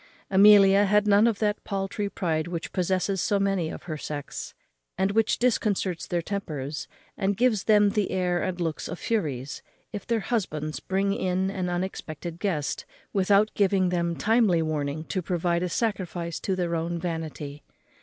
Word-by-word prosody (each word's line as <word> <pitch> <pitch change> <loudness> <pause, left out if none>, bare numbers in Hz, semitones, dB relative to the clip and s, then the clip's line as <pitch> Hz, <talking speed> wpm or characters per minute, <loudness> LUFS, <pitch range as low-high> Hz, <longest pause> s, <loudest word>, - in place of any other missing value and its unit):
Amelia 200 0 +7
had 210 +1 +3
none 205 +2 +5
of 225 -3 +1
that 210 -1 -1
paultry 200 +1 -2
pride 165 -5 -1
which 170 -1 -5
possesses 185 +1 0
so 205 - +1
many 195 -5 0
of - - -8
her 155 -3 -5
sex, 145 -2 -6 0.4
and 190 +1 +1
which 220 +1 +2
disconcerts 205 -7 0
their 175 -1 -1
tempers, 150 -7 -4 0.3
and 195 0 0
gives 225 -4 +2
them 210 -2 +5
the 210 -2 0
air 180 -1 0
and 185 -1 -2
looks 165 -3 -2
of 170 - -5
furies, 145 - -2 0.3
if 205 -2 -6
their 230 -2 +1
husbands 155 -10 -2
bring 195 +1 0
in 190 0 0
an 185 -2 -2
unexpected 175 -2 -4
guest, 165 -8 -2 0.3
without 200 +2 +3
giving 190 -2 +2
them 170 -1 0
timely 210 -7 +3
warning 155 -1 -2
to 185 +3 -3
provide 175 -1 0
a 180 - -1
sacrifice 180 -6 -2
to 190 - -1
their 175 -2 -1
own 170 +1 -2
vanity. 160 -4 -5
185 Hz, 165 wpm, -26 LUFS, 170-200 Hz, 0.4 s, Amelia